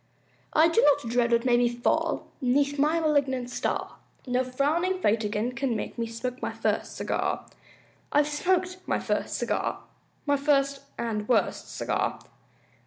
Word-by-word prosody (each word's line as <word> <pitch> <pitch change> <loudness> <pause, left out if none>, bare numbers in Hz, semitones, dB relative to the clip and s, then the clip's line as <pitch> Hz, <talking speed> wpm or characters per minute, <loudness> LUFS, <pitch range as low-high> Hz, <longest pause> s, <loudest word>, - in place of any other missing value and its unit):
I 320 +2 +6
do 335 +8 +3
not 290 - +4
dread 240 -1 +2
what 235 +1 +3
may 245 -1 +4
befall 240 0 +1 0.2
'Neath 280 +3 +2
my 305 +4 +3
malignant 275 -5 +1
star, - - -2 0.3
No 250 0 +1
frowning 310 +9 0
fate 220 - +2
again 210 +3 -1
can 255 -1 -1
make 210 - -4
Me 230 - -1
smoke 250 +3 -5
my - - -2
first - - -1
cigar. - - -2 0.7
I've 295 0 +4
smoked 365 +4 0
my - - +1
first - - -1
cigar! - - -1 0.4
My 285 -1 +2
first 275 -1 +2 0.2
and 215 -2 -3
worst 245 - 0
cigar! - - -1
265 Hz, 150 wpm, -27 LUFS, 240-295 Hz, 0.7 s, I